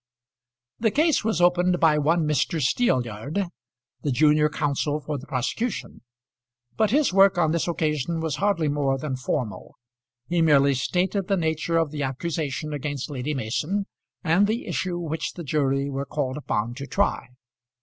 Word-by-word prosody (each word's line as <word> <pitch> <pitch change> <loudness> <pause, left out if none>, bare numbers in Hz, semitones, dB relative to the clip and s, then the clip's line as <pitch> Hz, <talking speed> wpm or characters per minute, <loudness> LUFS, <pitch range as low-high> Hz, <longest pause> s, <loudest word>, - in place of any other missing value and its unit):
The 225 - +3
case 310 +5 +2
was 220 -6 0
opened 180 0 +3
by 155 -2 +4
one 160 +2 +2
Mr. 150 +2 +1
Steelyard, 135 - 0 0.5
the 145 - -1
junior 150 +3 +4
counsel 150 0 -1
for 150 -1 -4
the 135 - -12
prosecution; 200 - -3 0.7
but 215 - +2
his 280 -1 +2
work 195 -1 +5
on 160 -3 +3
this 170 +1 0
occasion 160 -1 -1
was 160 -3 -2
hardly 195 -5 +1
more 140 -2 +1
than 135 -1 -3
formal. 125 -3 -4 0.5
He 175 -1 +1
merely 140 -3 +5
stated 180 +8 0
the 195 - +1
nature 160 0 0
of 165 -3 +1
the 150 -1 -4
accusation 150 +2 -3
against 145 -1 -4
Lady 140 +2 -3
Mason, 150 - -1 0.4
and 185 +4 +3
the 225 +3 -2
issue 175 +2 -2
which 160 -3 -3
the 175 - -7
jury 140 -2 0
were 140 0 -4
called 135 -3 -2
upon 120 -5 -2
to 140 -1 -6
try. 200 -6 0
155 Hz, 160 wpm, -25 LUFS, 140-175 Hz, 0.7 s, work